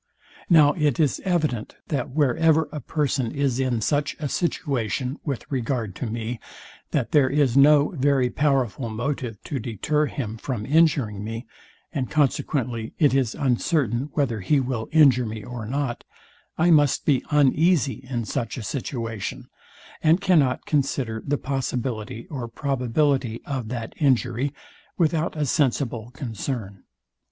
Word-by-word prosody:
Now 150 -4 +6
it 150 -2 +1
is 150 -5 +2
evident, 155 - -1
that 145 - -1
wherever 155 +3 +3
a 150 - -4
person 135 -4 -1
is 140 -3 0
in 125 -4 0
such 145 +5 0
a 150 - -2
situation 135 - -2
with 140 -5 -3
regard 120 -5 -2
to 125 - -3
me, 115 +1 -4 0.5
that - - -1
there 140 -3 +4
is 140 -3 +2
no 145 +1 +6
very 135 -5 +1
powerful 130 -5 0
motive 120 0 -3
to 140 - -3
deter 140 +7 0
him 115 -6 -4
from 115 -2 -4
injuring 140 -9 +2
me, 115 +3 -5 0.5
and 135 -5 -2
consequently 125 -5 0
it 145 -5 +4
is 130 -4 +1
uncertain 135 - 0
whether 120 -8 0
he 140 +10 +2
will 125 -4 -3
injure 135 -7 +5
me 110 -1 -6
or 120 -2 -6
not, 135 -1 -2 0.5
I 170 +2 +4
must 145 -4 +4
be 135 -4 +2
uneasy 150 -1 +3
in 120 -3 -2
such 115 +3 -3
a 120 - -5
situation, 115 -2 -4 0.5
and 160 +3 +4
cannot 160 -10 +2
consider 130 -6 -1
the 145 +1 0
possibility 125 -4 -3
or 130 -5 -4
probability 130 -1 0
of 130 -6 -3
that 115 -1 -5
injury 130 -1 +1 0.5
without 165 -1 +1
a 150 - +1
sensible 125 -5 0
concern. 110 -5 -5
130 Hz, 140 wpm, -24 LUFS, 115-145 Hz, 0.5 s, Now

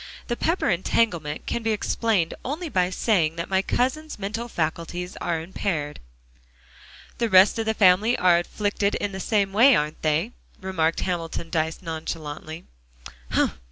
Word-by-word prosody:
The 240 - 0
Pepper 330 +8 0
entanglement 170 -4 0
can 235 - -2
be 225 -1 0
explained 210 -4 0
only 310 +6 -4
by 180 -7 +1
saying 180 -5 +1
that 170 +3 -5
my 190 0 +3
cousin's 300 +9 -1
mental 210 +4 -4
faculties 175 -1 -3
are 170 -2 -1
impaired." 160 -3 -3 1.2
"The 235 -1 +1
rest 190 +3 +6
of 225 - -2
the 220 - +1
family 205 +5 +4
are 175 -1 +4
afflicted 205 +2 -1
in 205 - -2
the 190 - -6
same 200 -1 0
way, 250 +6 +7
aren't 150 +1 -2
they?" 160 +8 +1 0.3
remarked 170 -4 0
Hamilton 170 -2 -3
Dyce 160 +2 -1
nonchalantly. 160 -1 -6
185 Hz, 145 wpm, -24 LUFS, 165-220 Hz, 1.2 s, way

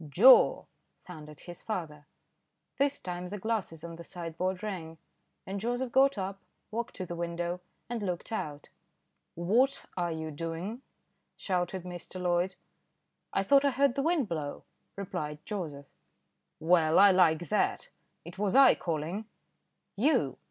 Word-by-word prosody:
"Joe," 235 - +7 0.4
thundered 150 -4 -11
his 175 -2 -10
father. 155 -8 -5 0.7
This 280 0 +2
time 180 0 -5
the 205 +3 -5
glasses 200 -6 -3
on 165 -1 -7
the 170 - -9
sideboard 180 +3 -4
rang, 170 -6 -5 0.5
and 195 +1 -4
Joseph 245 +3 -2
got 270 -1 +4
up, 195 0 -4 0.3
walked 235 +2 -4
to 185 - -4
the 175 - -6
window 170 +1 -3 0.3
and 240 -1 -3
looked 180 +1 -3
out. 150 -9 -4 0.7
"What 230 +11 +2
are 175 -2 -1
you 160 -1 -4
doing?" 165 - -5 0.6
shouted 180 -1 -2
Mr. 180 +1 -7
Loyd. 180 +1 +1 0.8
"I 195 - +1
thought 275 +7 +5
I 285 - +4
heard 275 0 +2
the 275 - -1
wind 315 -4 +1
blow," 150 -5 -4 0.3
replied 150 -6 -4
Joseph. 160 -9 -5 0.7
"Well! 160 -1 +4
I 200 0 +8
like 170 -3 +3
that; - - 0 0.3
it 175 +3 -10
was 205 0 +1
I 275 0 +8
calling." 170 +6 -3 0.7
"You!" 240 - +2
180 Hz, 140 wpm, -30 LUFS, 165-215 Hz, 0.8 s, I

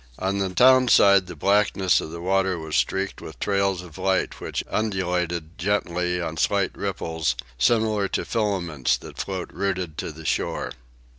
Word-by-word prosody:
On 95 +1 -1
the 95 -1 0
town 130 +7 +5
side 100 -4 +6
the 90 - -8
blackness 95 +1 +2
of - - -6
the 85 +1 -7
water 95 0 +1
was 80 -1 -5
streaked 95 +1 0
with 70 -6 -10
trails 100 -2 0
of 85 -3 -12
light 95 -1 0
which - - -3
undulated 90 -5 -2
gently 90 -2 0
on 80 -2 -4
slight - - +1
ripples, 80 -1 -2 0.2
similar 110 - +2
to - - -2
filaments 95 - 0
that - - -12
float 95 -2 -4
rooted 90 -4 -2
to - - -4
the 80 +1 -12
shore. 60 - -1
95 Hz, 160 wpm, -24 LUFS, 85-100 Hz, 0.2 s, side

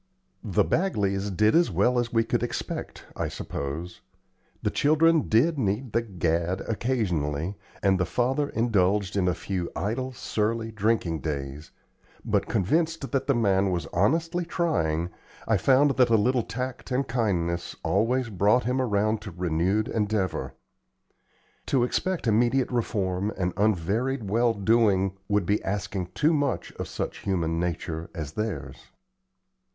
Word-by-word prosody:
The 105 -2 +2
Bagleys 105 - 0
did 105 +3 +3
as 170 +1 +4
well 110 +7 +2
as 120 -1 -2
we 115 -1 +3
could 115 0 -1
expect, 120 - -4
I - - -2
suppose. 80 +5 -5 0.6
The - - +1
children 155 +1 +3
did 140 +8 +3
need 110 +2 -1
the 115 - +3
"gad" 85 -4 -1
occasionally 90 - -1 0.3
and 95 -2 +3
the 90 - +2
father 135 +6 0
indulged 100 -3 +1
in 95 -2 +2
a 90 - +1
few 90 -1 -3
idle, 130 +6 -2
surly, 115 -1 -2
drinking 105 -6 0
days; 70 -1 -5 0.6
but, - - +1
convinced 160 - 0
that 135 - 0
the 140 - +3
man 100 -4 +2
was 90 -2 -1
honestly 165 - +1
trying, 85 - 0 0.4
I 110 - +3
found 135 +8 +4
that 125 -2 +5
a 115 - +5
little 125 +4 +2
tact 125 +4 -5
and 130 +1 0
kindness 90 -8 -1
always 120 +5 +1
brought 105 +5 +3
him 125 +2 0
around 110 -2 +1
to 100 - -7
renewed 90 +5 0
endeavor. 105 -6 -1 1.1
To 130 -3 +2
expect 185 +7 -1
immediate 120 +4 +2
reform 100 -4 -1
and 90 -1 -1
unvaried 105 +4 0
well 115 +1 +3
doing 100 -3 +2
would 105 -3 +1
be 100 +4 +1
asking 95 -2 -3
too 155 +7 +3
much 145 -3 -1
of - - -3
such - - -4
human 85 -4 -1
nature 85 -1 -3
as 75 -4 -4
theirs. 75 -9 -5
105 Hz, 145 wpm, -26 LUFS, 90-125 Hz, 1.1 s, that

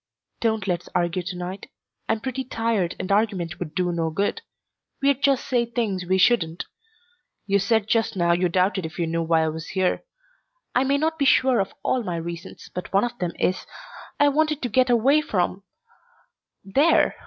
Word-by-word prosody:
"Don't 220 -3 0
let's 180 -2 -2
argue 175 +1 +1
to 180 +1 -6
night. 180 +2 -6 0.4
I'm 220 -1 +1
pretty 265 +1 -3
tired 225 -7 -1
and 185 - -3
argument 195 -5 0
would 160 -3 -6
do 180 -1 +1
no 165 -1 -1
good. 200 - -1 0.6
We'd 275 -1 +2
just 275 -2 +2
say 245 -2 +2
things 225 -6 -2
we 190 +1 +2
shouldn't. 180 -5 +2 0.8
You 200 0 +2
said 210 +1 +1
just 225 -1 +1
now 170 -1 +2
you 175 +1 +2
doubted 185 +2 +1
if 160 +1 -7
you 170 - 0
knew 165 +1 -1
why 165 0 +2
I 160 - +1
was 160 +1 -6
here. 185 -2 0 0.7
I 255 - +2
may 280 +1 +2
not 320 +2 -1
be 280 - +2
sure 260 -2 +4
of 195 - -2
all 255 - +1
my 180 -6 -3
reasons, 170 +2 -7
but 180 - -6
one 195 +1 +3
of 240 0 -2
them 175 -2 -2
is, 185 - -1 0.5
I 290 - +6
wanted 305 0 0
to 245 - -1
get 255 +3 +3
away 260 +6 +4
from 190 -8 -1 1.0
there." 275 - +3
195 Hz, 190 wpm, -24 LUFS, 175-245 Hz, 1.0 s, I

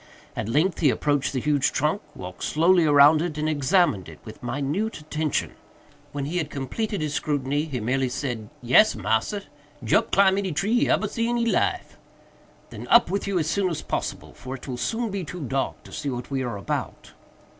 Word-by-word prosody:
At 110 - -3
length 155 +10 +1
he 150 - +4
approached 145 0 0
the 130 - -1
huge 145 0 +1
trunk, 155 +8 0
walked 90 -1 -9
slowly 170 +2 +3
around 145 +1 +6
it, 165 -3 -3
and 155 0 -1
examined 150 - +2
it - - -12
with - - -11
minute 145 - -2
attention. 155 0 -2 0.6
When 140 -1 -3
he 165 +5 -3
had 160 -5 -1
completed 195 - -3
his 150 -1 -2
scrutiny, 145 0 -1
he 140 -6 -4
merely 130 +4 0
said, 120 -5 -4
"Yes, 130 - +5
massa, 110 - -1 0.4
Jup 110 - +2
climb 195 0 +4
any 190 -4 -2
tree 200 +9 0
he 240 - +3
ebber 215 - +2
see 230 +3 -1
in 240 - 0
he 235 - +1
life." 230 - 0 0.7
"Then - - -8
up 235 -7 +5
with 200 +1 -1
you 200 -2 0
as 160 - +1
soon 190 +3 +1
as 165 - -4
possible, - - -4
for 130 +1 -7
it 135 - -11
will 130 - -3
soon 225 - -2
be 195 -1 -3
too 175 +2 -7
dark 135 +2 -2
to - - -14
see 145 - -3
what 125 +1 -5
we 135 -1 -1
are 120 -5 -3
about." 100 - -4
150 Hz, 200 wpm, -25 LUFS, 130-185 Hz, 0.7 s, around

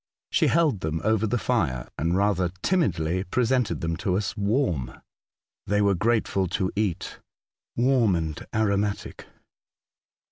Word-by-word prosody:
She - - +3
held 155 - +2
them 80 -1 -2
over 110 0 +2
the 120 - 0
fire, 65 - -1
and 85 +5 0
rather 95 -3 +2
timidly 95 - +1
presented 125 +3 0
them 80 0 -1
to 90 +1 0
us 100 -2 -2
warm. 100 - -1 0.7
They 105 +1 +2
were 100 -1 +4
grateful 100 -1 +1
to 95 -1 -1
eat 100 -5 -2 0.3
— - - -78 0.3
warm 120 -5 +3
and 80 -2 -3
aromatic. 105 -2 -1
100 Hz, 135 wpm, -25 LUFS, 90-110 Hz, 0.7 s, were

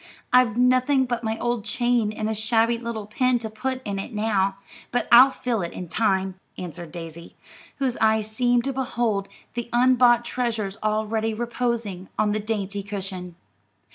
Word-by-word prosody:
I've 250 -3 +5
nothing 255 +2 +3
but 240 -1 -3
my 220 0 -1
old 240 -2 -1
chain 240 -1 +1
and 215 0 -3
a 220 - 0
shabby 225 +2 +1
little 230 -3 -5
pin 250 +4 +1
to 225 -2 -6
put 260 +4 -3
in 200 -1 -3
it 210 - -6
now, 200 -3 +1 0.3
but 245 - 0
I'll 250 +3 +9
fill 245 -5 -2
it 170 - -4
in 180 - -6
time," 190 -1 0 0.2
answered 175 -2 -7
Daisy, 170 0 -9 0.4
whose 265 -3 -1
eyes 220 -1 +2
seemed 245 +1 +2
to 275 - -2
behold 235 -6 -1 0.3
the 240 -1 -4
unbought 240 -1 +4
treasures 225 -5 -2
already 215 +1 0
reposing 235 -5 -3
on 210 -1 +2
the 215 - 0
dainty 205 -2 -3
cushion. 190 -3 -6
225 Hz, 165 wpm, -24 LUFS, 205-240 Hz, 0.4 s, I'll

